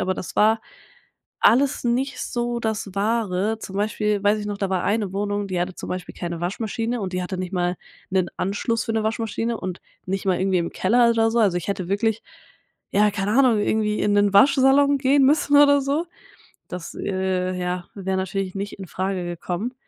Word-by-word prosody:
aber 185 0 0
das 180 - -7
war 220 +1 +4 0.8
alles 270 +2 +3
nicht 255 +3 0
so 240 -1 -2
das 220 -3 -2
Wahre. 210 0 0
Zum 195 -2 -7
Beispiel 210 0 0
weiß 205 +1 +3
ich 205 - -5
noch, 205 -1 -4
da 195 -1 -2
war 185 -2 0
eine 205 -2 0
Wohnung, 205 0 -2
die 185 -2 -2
hatte 180 +1 -3
zum - - -8
Beispiel 180 0 -5
keine 170 -1 -5
Waschmaschine. 225 +6 -2
Und 190 -3 -4
die 180 0 -1
hatte 185 +1 -4
nicht 185 +1 -5
mal 180 -1 0 0.3
'nen 185 -2 +1
Anschluss 215 +4 -1
für - - -3
'ne 220 - +1
Waschmaschine 225 +1 -2
und 185 -2 -5 0.3
nicht 195 +1 -3
mal 185 -2 +2
irgendwie 190 0 +1
im 170 - -3
Keller 235 +5 +3
oder 225 -1 +2
so. 235 - +1
Also, 200 -5 +3
ich 175 - -5
hätte 190 -3 -3
wirklich 210 +3 0 0.7
ja, 210 +1 +3
keine 200 0 -1
Ahnung, 250 -6 +5
irgendwie 210 0 0
in 205 - +2
'nen 205 0 +3
Waschsalon 275 +5 +5
gehen 275 +1 +3
müssen 290 +1 +3
oder 285 0 +6
so. 285 +5 -1 0.6
Das, 180 -2 -7
äh, 185 -1 -1
ja, 180 0 -3
wäre 190 -1 -2
natürlich 190 0 -3
nicht 200 +1 -5
in 190 - -7
Frage 185 0 -3
gekommen. 175 +7 -4
205 Hz, 195 wpm, -23 LUFS, 185-230 Hz, 0.8 s, oder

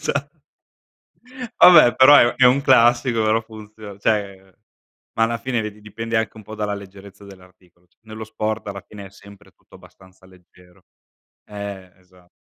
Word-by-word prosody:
Esat - - -3 1.3
Vabbè, 155 -10 +7
però 130 +6 +6
è 120 -4 +4
è 130 - +4
un 130 +3 +3
classico 120 -2 +2
però 110 +1 +1
funziona 110 -2 -13
cioè, 100 -3 -3 0.6
ma 115 - 0
alla 115 +1 -1
fine 120 +1 -3
vedi 105 0 -9
dipende 115 +2 -7
anche 110 0 -3
un 110 - -13
po' 110 +2 -11
dalla 105 -1 -4
leggerezza 100 0 -13
dell'articolo 90 -2 -20
c 90 - -42
Nello 110 0 -10
sport, 110 0 -5
alla 100 -1 -7
fine 100 -2 -12
è - - -19
sempre 100 +1 -18
tutto - - -23
abbastanza 95 0 -20
leggero. 90 -1 -23 0.6
Eh, 100 -3 -9
esa 90 -1 -26
105 Hz, 160 wpm, -20 LUFS, 95-115 Hz, 1.3 s, Vabbè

